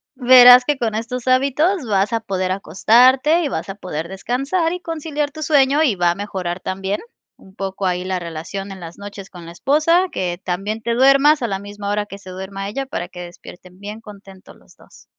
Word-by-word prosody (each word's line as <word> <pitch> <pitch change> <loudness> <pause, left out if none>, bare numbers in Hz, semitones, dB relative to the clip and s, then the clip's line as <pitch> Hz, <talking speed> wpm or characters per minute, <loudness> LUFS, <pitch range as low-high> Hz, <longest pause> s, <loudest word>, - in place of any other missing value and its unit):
Verás 250 -1 +8
que 295 0 0
con 225 -4 -2
estos 240 +3 -5
hábitos 280 +6 +2
vas 205 +1 0
a 230 - +1
poder 185 -4 -3
acostarte 250 - +3
y 295 - 0
vas 265 - -4
a 195 - -5
poder 170 -5 -6
descansar 275 - -2
y 360 - -6
conciliar 305 -3 -4
tu 310 +1 -7
sueño 290 0 +3
y 255 -10 +2
va 175 -1 +2
a - - -4
mejorar 185 -3 -4
también 195 +2 -3 0.4
un 190 0 -19
poco 195 0 -4
ahí 180 0 -1
la 185 0 -2
relación 170 +4 -7
en 190 - -9
las 165 0 -10
noches 200 -1 -10
con 175 -2 -12
la 165 - -9
esposa, 310 - +2
que 175 -2 -3
también 195 +5 -3
te 230 +1 -1
duermas 275 +4 +4
a 235 - -1
la 195 -2 -3
misma 205 0 -7
hora 205 0 -1
que 200 -1 -10
se 195 -2 -12
duerma 195 +1 -6
ella 270 +7 -4
para 175 -10 -5
que 180 0 -10
despierten 180 +1 -13
bien 210 +2 -8
contentos 195 -3 -14
los - - -23
dos. - - -20
205 Hz, 210 wpm, -19 LUFS, 190-265 Hz, 0.4 s, Verás